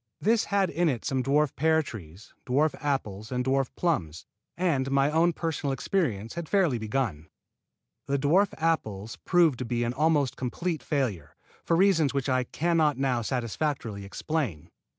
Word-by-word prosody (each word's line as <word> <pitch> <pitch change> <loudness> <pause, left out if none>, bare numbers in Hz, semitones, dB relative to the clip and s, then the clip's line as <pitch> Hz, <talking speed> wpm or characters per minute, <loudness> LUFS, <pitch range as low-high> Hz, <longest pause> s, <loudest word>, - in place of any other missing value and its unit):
This 225 +2 +2
had 200 -2 +1
in 170 +3 +2
it 120 -6 -3
some 135 -3 0
dwarf 145 +2 +1
pear 160 +2 +3
trees, 95 - -11
dwarf 145 +5 +2
apples 110 -7 -2
and 125 0 -1
dwarf 135 -1 +1
plums, 90 - -1 0.3
and 150 -7 +1
my 135 +1 +2
own 165 +2 +3
personal 160 -4 -2
experience 125 - -1
had 170 -2 -6
fairly 175 - +2
begun. 110 - -2 0.8
The 140 - +1
dwarf 165 +9 +3
apples 115 -11 -1
proved 170 -8 +3
to 125 - -3
be 120 +1 -1
an 120 +1 -1
almost 150 -2 +2
complete 160 +6 -3
failure, 110 - -2 0.3
for 165 - +1
reasons 165 -7 +3
which 140 0 -1
I 130 -1 +1
can 170 +6 0
not 150 -4 +3
now 130 -3 0
satisfactorily 120 -2 -2
explain. 105 - -3
140 Hz, 160 wpm, -27 LUFS, 120-160 Hz, 0.8 s, pear